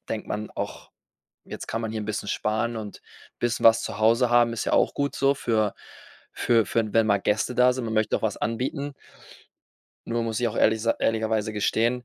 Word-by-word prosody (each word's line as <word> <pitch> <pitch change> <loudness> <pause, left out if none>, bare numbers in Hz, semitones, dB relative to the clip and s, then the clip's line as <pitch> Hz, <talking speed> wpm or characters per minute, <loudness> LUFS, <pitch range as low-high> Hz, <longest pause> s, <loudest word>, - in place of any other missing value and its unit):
denkt 110 - -3
man 105 +1 -4
auch, - - -6 0.5
jetzt - - -8
kann 115 - -3
man 110 -1 -3
hier 110 -1 -3
'n - - -6
bisschen 105 -1 -4
sparen 110 +2 -1
und 105 -2 -8 0.4
bisschen 120 -1 -1
was 115 0 +7
zu 100 - -5
Hause 115 +3 +3
haben, 120 -1 +4
ist 115 - -3
ja - - -1
auch - - +3
gut 140 0 -2
so 140 +1 +3
für 110 -5 0 0.6
für 115 -3 +2
für 110 0 -1
wenn 115 -1 +3
mal 100 -1 +4
Gäste 105 +5 0
da 125 0 +5
sind. 130 -1 -4
Man 110 - -3
möchte 110 -1 +1
auch - - -11
was - - -1
anbieten. 135 +5 -3 1.1
Nur 115 0 -1
muss 115 0 -2
ich 120 - +2
auch - - -7
ehrlich 110 0 +3
sa 115 - +2
ehrlicherweise 110 -1 0
gestehen, 115 +4 0
115 Hz, 210 wpm, -25 LUFS, 110-120 Hz, 1.1 s, was